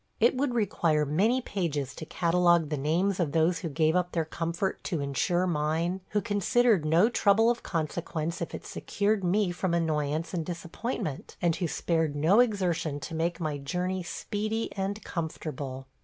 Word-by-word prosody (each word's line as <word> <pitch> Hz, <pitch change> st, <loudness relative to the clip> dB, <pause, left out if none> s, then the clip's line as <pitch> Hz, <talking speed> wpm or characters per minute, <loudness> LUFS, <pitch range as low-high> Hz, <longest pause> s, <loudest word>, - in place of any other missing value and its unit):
It 235 Hz, +3 st, +4 dB
would 255 Hz, -1 st, 0 dB
require 165 Hz, -8 st, +2 dB
many 205 Hz, -, +2 dB
pages 150 Hz, -, -2 dB
to 160 Hz, -, -8 dB
catalogue 175 Hz, -2 st, +3 dB
the 155 Hz, -, -1 dB
names 170 Hz, +8 st, +1 dB
of 160 Hz, -5 st, 0 dB
those 165 Hz, +2 st, +3 dB
who 170 Hz, -, -4 dB
gave 155 Hz, +2 st, +2 dB
up 180 Hz, -1 st, 0 dB
their 165 Hz, -2 st, 0 dB
comfort 170 Hz, +4 st, -2 dB
to 170 Hz, -, -1 dB
insure 160 Hz, +6 st, 0 dB
mine, 165 Hz, +3 st, 0 dB
who 210 Hz, -, +1 dB
considered 210 Hz, -, +2 dB
no 165 Hz, +7 st, +5 dB
trouble 225 Hz, 0 st, +4 dB
of 240 Hz, -, -3 dB
consequence 165 Hz, +1 st, -3 dB
if 170 Hz, -, -4 dB
it -, -, -9 dB
secured 205 Hz, 0 st, -1 dB
me 185 Hz, +1 st, +2 dB
from 175 Hz, 0 st, -1 dB
annoyance 155 Hz, 0 st, -1 dB
and 170 Hz, -3 st, -1 dB
disappointment, 170 Hz, -, -5 dB
and 170 Hz, -2 st, +1 dB
who 175 Hz, -, -1 dB
spared 160 Hz, -2 st, 0 dB
no 165 Hz, +9 st, +4 dB
exertion 180 Hz, -10 st, +1 dB
to 165 Hz, -, -6 dB
make 170 Hz, +2 st, -1 dB
my 155 Hz, -4 st, -2 dB
journey 180 Hz, +6 st, -2 dB
speedy 215 Hz, +5 st, -3 dB
and 200 Hz, +2 st, -3 dB
comfortable. 145 Hz, -5 st, -5 dB
170 Hz, 170 wpm, -28 LUFS, 155-195 Hz, -, no